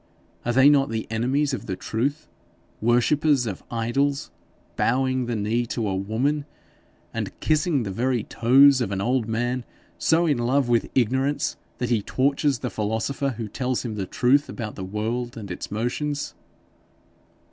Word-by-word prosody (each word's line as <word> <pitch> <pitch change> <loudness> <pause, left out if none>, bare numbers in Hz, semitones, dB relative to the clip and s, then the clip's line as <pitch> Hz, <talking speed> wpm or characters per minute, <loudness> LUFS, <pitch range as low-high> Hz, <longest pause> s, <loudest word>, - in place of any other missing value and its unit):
Are 120 - 0
they 130 +3 +6
not 140 -2 +5
the 110 -1 -2
enemies 130 +6 +1
of 115 - -4
the 95 - -2
truth 140 +11 -2 0.5
worshippers 125 +4 +3
of 100 -5 -4
idols, 135 +5 -1 0.4
bowing 130 0 +1
the 120 - -1
knee 110 +3 0
to 115 -2 -2
a 95 - -1
woman, 125 +10 -1 0.7
and - - -4
kissing 155 -3 +1
the 100 - -4
very 120 +2 0
toes 135 +3 +5
of 110 - -1
an 100 - -2
old 120 +2 0
man 120 +2 -1 0.4
so 165 +2 +3
in 145 -6 +1
love 130 +2 +2
with 120 -2 +1
ignorance, 130 +4 +1 0.2
that 125 -1 -2
he 115 -3 +3
tortures 140 +4 +1
the - - -4
philosopher 110 +5 -1
who 115 -2 -4
tells 125 +4 -2
him 115 - -3
the 100 -3 -4
truth 140 +4 +2
about 110 -4 -5
the 95 - -7
world 115 +5 -3
and 100 -4 -7
its 90 - -6
motions?' 140 +7 -2
120 Hz, 160 wpm, -24 LUFS, 110-140 Hz, 0.7 s, they